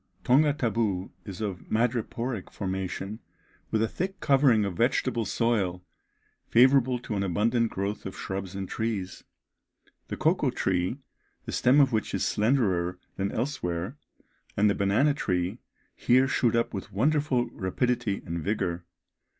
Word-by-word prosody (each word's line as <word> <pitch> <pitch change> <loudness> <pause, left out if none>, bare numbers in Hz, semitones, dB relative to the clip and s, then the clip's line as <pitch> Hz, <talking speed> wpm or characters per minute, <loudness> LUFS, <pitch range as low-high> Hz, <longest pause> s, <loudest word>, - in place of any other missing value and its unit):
Tonga 145 +4 +4
Tabou 110 -9 -1
is 100 0 -7
of 100 -4 -3
madreporic 115 -1 -1
formation, 95 +2 -4 0.5
with 110 0 +1
a - - +2
thick 190 - -4
covering 135 -7 +4
of 95 -3 -3
vegetable 120 0 +1
soil, 95 -8 0 0.6
favourable 130 +1 +5
to 120 -3 -5
an 100 - 0
abundant 110 +5 +1
growth 100 +1 -3
of 95 - -8
shrubs 95 0 -5
and 95 -1 -4
trees. 105 -4 -3 0.8
The - - -5
cocoa - - +2
tree, 90 +5 0 0.5
the - - -5
stem 130 +4 +4
of 135 -2 +5
which 110 - -1
is - - 0
slenderer 100 -7 +1 0.2
than 100 +1 -1
elsewhere, 105 - -2 0.6
and 105 +1 +4
the 100 - +3
banana 105 +10 +2
tree 95 -4 -1 0.4
here 130 +2 +3
shoot 120 -4 +2
up 115 - 0
with 95 - -6
wonderful 135 +2 +1
rapidity 115 +2 -1
and 85 -2 -4
vigour. 90 -4 -1
110 Hz, 140 wpm, -27 LUFS, 95-125 Hz, 0.8 s, favourable